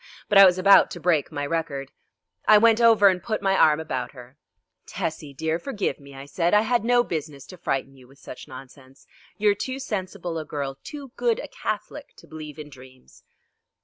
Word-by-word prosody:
But 200 - +6
I 195 - +11
was 180 0 +2
about 195 +2 +6
to 175 - -8
break 165 -4 +1
my 145 -2 -4
record. 145 -3 -4 0.6
I 215 - +8
went 225 +1 +4
over 225 -3 +6
and 185 -2 +2
put 215 +1 -3
my 195 -1 +1
arm 155 -4 +4
about 130 -6 -4
her. 125 0 -14 0.5
"Tessie 155 -2 -5
dear, 160 +4 -2
forgive 210 - -3
me," 140 -1 -14
I 135 +1 -9
said; 170 +6 0
"I 210 - +5
had 235 +1 0
no 240 +1 +3
business 150 - -6
to 185 - -12
frighten 135 -4 -3
you 130 -2 -18
with 135 +2 -21
such 130 - -11
nonsense. 130 0 -14 0.3
You 210 0 +3
are - - +2
too 260 +6 -5
sensible 185 -8 -5
a - - -5
girl, 140 -3 -5
too 280 -4 -9
good 470 -2 +1
a - - -7
Catholic - - -6
to - - -17
believe 155 -2 -10
in 150 -1 -10
dreams." 130 -1 -17
165 Hz, 205 wpm, -24 LUFS, 140-205 Hz, 0.6 s, I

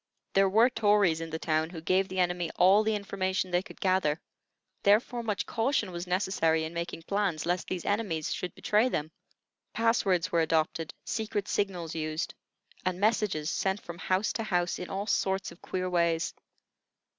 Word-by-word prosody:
There 195 0 +4
were 225 +6 +5
Tories 205 -8 +3
in 165 - -5
the 160 - -3
town 160 0 0
who 170 -2 -7
gave 185 +4 +2
the 185 - -6
enemy 175 -2 +1
all 190 +4 +6
the 220 0 +1
information 190 -2 -2
they 175 0 +2
could 200 - -13
gather; 185 -5 +2 0.6
therefore 220 +4 +3
much 215 -3 -2
caution 225 -4 0
was 175 +1 -5
necessary 180 -3 +1
in 160 +1 -5
making 170 -1 -4
plans, 195 -4 -1
lest 175 0 -1
these 180 -2 -4
enemies 200 -7 -1
should 180 - -5
betray 215 +4 +2
them. 155 -8 -2 0.6
Pass 230 0 +2
words 185 -2 +1
were 170 - +3
adopted, 160 0 0
secret 215 -2 -2
signals 180 -5 -1
used, 155 0 -3 0.5
and 185 -1 -1
messages 205 -7 +1
sent 190 +1 0
from 170 -3 -9
house 185 +3 0
to 225 - -2
house 180 -4 0
in 180 - -6
all 195 +1 -3
sorts 190 -2 0
of - - -15
queer 185 0 -3
ways. 170 -2 +1
185 Hz, 175 wpm, -29 LUFS, 165-205 Hz, 0.6 s, all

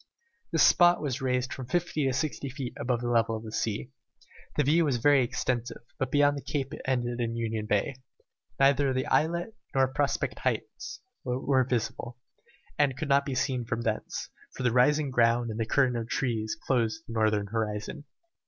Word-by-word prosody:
This - - +4
spot 175 0 +6
was 140 -3 -3
raised 125 -1 0
from 130 -2 -7
fifty 160 -2 0
to - - +2
sixty 140 0 -2
feet 130 -2 -5
above 120 -1 0
the 120 - -2
level 115 -2 +2
of 110 - -9
the 110 - -7
sea. 110 +3 -2 0.6
The 150 - +3
view 160 +5 +4
was 140 -5 +1
very 140 +2 +4
extensive, 120 0 -2 0.2
but 130 - -1
beyond 145 0 +4
the 140 - -5
cape 140 -1 -3
it - - -7
ended 120 -2 -1
in 115 -1 -1
Union 110 -2 -2
Bay. 105 +6 0 0.6
Neither 135 0 +4
the 130 0 -1
islet 170 +7 0 0.2
nor 135 0 +4
Prospect 145 0 -1
Heights - - -3 0.2
were 130 +1 +1
visible, 120 0 -3 0.6
and 140 -3 +2
could 150 +2 -4
not 140 0 +4
be 135 - -2
from 125 -3 -1
thence, 110 -2 -3 0.3
for - - -4
the 125 -2 +2
rising 145 +3 +3
ground 120 -1 +3
and 110 - -5
the 110 - -1
curtain 130 0 +2
of 115 0 -3
trees 115 -6 -1
closed 125 +4 0
the 115 - -7
northern 110 -2 +2
horizon. 110 +7 -3
125 Hz, 180 wpm, -28 LUFS, 115-140 Hz, 0.6 s, spot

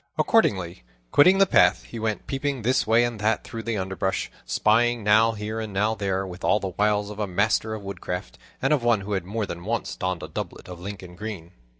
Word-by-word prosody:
Accordingly, 95 - +2 0.3
quitting 180 +7 +6
the 195 - +6
path, - - +4
he 115 - -8
went 110 -1 -2
peeping 135 -2 -2
this 125 -1 +2
way 115 +2 +5
and 120 -2 -2
that 110 +1 +1
through 115 - -6
the 115 -1 -2
underbrush, 95 0 -2 0.2
spying 115 - +2
now 110 +2 +5
here 110 +1 -4
and 110 -2 -4
now 105 +3 +1
there, 95 -2 -1
with 90 0 -9
all 105 - +3
the 95 - -3
wiles 105 +2 0
of 105 - -9
a 105 - -1
master 110 +3 +1
of 105 - -8
woodcraft, 90 -8 -6 0.2
and 135 +3 +3
of 145 - +2
one 120 -3 +2
who 100 +2 -7
had 95 -4 -1
more 105 +3 -2
than 85 -2 -7
once 115 +4 -2
donned 90 -4 -3
a - - -5
doublet - - -6
of 90 -1 -9
Lincoln 90 -1 -8
green. 90 -4 -7
105 Hz, 220 wpm, -25 LUFS, 95-115 Hz, 0.3 s, quitting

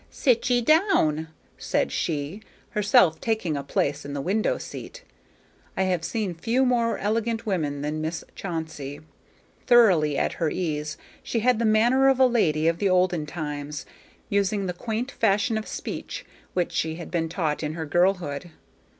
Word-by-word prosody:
"Sit 250 -1 +1
ye 245 -1 +3
down," 235 - +3 0.3
said - - 0
she, 155 +5 -2 0.3
herself 205 - +4
taking 220 -9 -1
a 140 - -2
place 145 +1 -1
in 140 - -6
the 140 - -3
window 200 +8 0
seat. - - -9 0.7
I 190 - +2
have 180 -3 0
seen 210 -2 -2
few 230 +10 +1
more 235 -2 +2
elegant 225 +2 -1
women 150 -8 -1
than 150 +1 -2
Miss 160 +1 -3
Chauncey. 160 -6 -5 0.7
Thoroughly 185 - +5
at - - 0
her 160 - +2
ease, 150 -4 -3 0.2
she 230 - -2
had 245 0 +3
the 235 - +1
manner 240 +5 +4
of 265 -1 +2
a 260 - +7
lady 165 -11 +2
of 165 0 +1
the 200 - +2
olden 180 -4 +2
times, 150 -2 -5 0.4
using 200 -1 0
the 180 - -2
quaint 225 +7 -3
fashion 215 0 +1
of 220 0 -3
speech - - -6 0.3
which 180 -2 0
she 160 0 -1
had 170 0 -8
been 165 -2 -1
taught 160 -4 -1
in 155 -1 -2
her 160 -1 -4
girlhood. 175 -1 +1
180 Hz, 165 wpm, -25 LUFS, 155-225 Hz, 0.7 s, a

